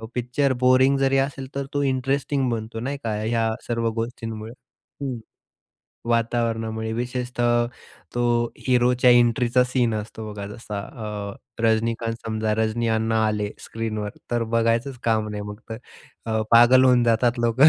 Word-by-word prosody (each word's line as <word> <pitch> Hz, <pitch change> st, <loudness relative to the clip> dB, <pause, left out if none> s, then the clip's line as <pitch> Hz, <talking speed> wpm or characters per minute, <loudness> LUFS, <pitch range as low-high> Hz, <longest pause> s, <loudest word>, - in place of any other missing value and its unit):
Picture 125 Hz, +3 st, +1 dB
boring 130 Hz, +2 st, +5 dB
जरी 135 Hz, 0 st, +3 dB
असेल, 135 Hz, -2 st, -8 dB
तर 140 Hz, -1 st, -2 dB
तो 145 Hz, 0 st, +1 dB
इंटरेस्टिंग 135 Hz, 0 st, 0 dB
बनतो, 115 Hz, 0 st, -4 dB
नाही 140 Hz, +4 st, -3 dB
का? 110 Hz, -2 st, -1 dB
ह्या 115 Hz, 0 st, +1 dB, 0.2 s
सर्व 115 Hz, -1 st, 0 dB
गोष्टींमुळे. 115 Hz, -1 st, -6 dB, 0.5 s
हं. 125 Hz, -4 st, -3 dB, 0.9 s
वातावरणामुळे 115 Hz, -1 st, 0 dB
विशेषतः 120 Hz, 0 st, 0 dB, 0.5 s
तो 120 Hz, -, -1 dB, 0.5 s
हिरोच्या 125 Hz, 0 st, +4 dB
एंट्रीचा 120 Hz, +1 st, +4 dB
सीन 125 Hz, -3 st, +1 dB
असतो 110 Hz, 0 st, -5 dB
बघा 100 Hz, -1 st, -6 dB
जसा 105 Hz, -1 st, -6 dB, 0.5 s
अ, -, -, -13 dB, 0.3 s
रजनीकांत 115 Hz, +1 st, +1 dB
समजा 110 Hz, -1 st, 0 dB
रजनी 110 Hz, +1 st, 0 dB
अण्णा 110 Hz, 0 st, +1 dB
आले 105 Hz, -1 st, -1 dB
स्क्रीनवर, 110 Hz, -2 st, -4 dB, 0.2 s
तर 120 Hz, -1 st, +1 dB
बघायचंच 115 Hz, +3 st, +1 dB
काम 110 Hz, -2 st, +1 dB
नाही 105 Hz, -1 st, -4 dB
मग 105 Hz, +1 st, -8 dB
तर. 110 Hz, -, -4 dB, 0.5 s
अ, 110 Hz, -1 st, 0 dB
पागल 125 Hz, +3 st, +7 dB
होऊन 125 Hz, -1 st, +5 dB
जातात 120 Hz, +1 st, +2 dB
लोकं. 120 Hz, +6 st, +6 dB
115 Hz, 140 wpm, -24 LUFS, 110-125 Hz, 0.9 s, पागल